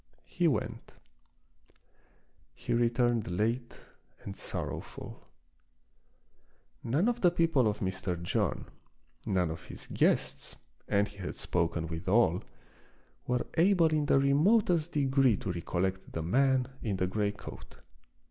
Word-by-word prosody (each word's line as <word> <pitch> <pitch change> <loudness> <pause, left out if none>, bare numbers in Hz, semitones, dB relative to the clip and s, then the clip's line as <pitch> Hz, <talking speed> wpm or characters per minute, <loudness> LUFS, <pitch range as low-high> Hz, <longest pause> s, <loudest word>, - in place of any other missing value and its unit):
He 175 - 0
went. 120 -5 -2 1.6
He - - -3
returned 120 -2 +2
late 115 +7 -1 0.5
and 100 - -7
sorrowful. - - -6 1.6
None 145 - +1
of 240 0 0
the 180 - +6
people 165 -8 +2
of 105 - -2
Mr. 95 -2 -2
John, 85 - -1 0.6
none 90 -4 +1
of 80 - -8
his - - -9
guests, 65 0 +1 0.3
and 100 +1 +2
he 105 - -14
had 95 - -5
spoken 85 -1 -1
with 80 +2 -5
all, 95 -4 +3 0.9
were 125 0 0
able 175 -2 +5
in 155 -2 0
the - - +4
remotest 165 +4 +3
degree 135 -5 +3
to 95 - -3
recollect 95 +2 -2
the 80 - -3
man 130 +6 +2
in 105 -4 -1
the 95 - 0
gray 100 +2 0
coat. 105 - -11
115 Hz, 125 wpm, -30 LUFS, 95-140 Hz, 1.6 s, the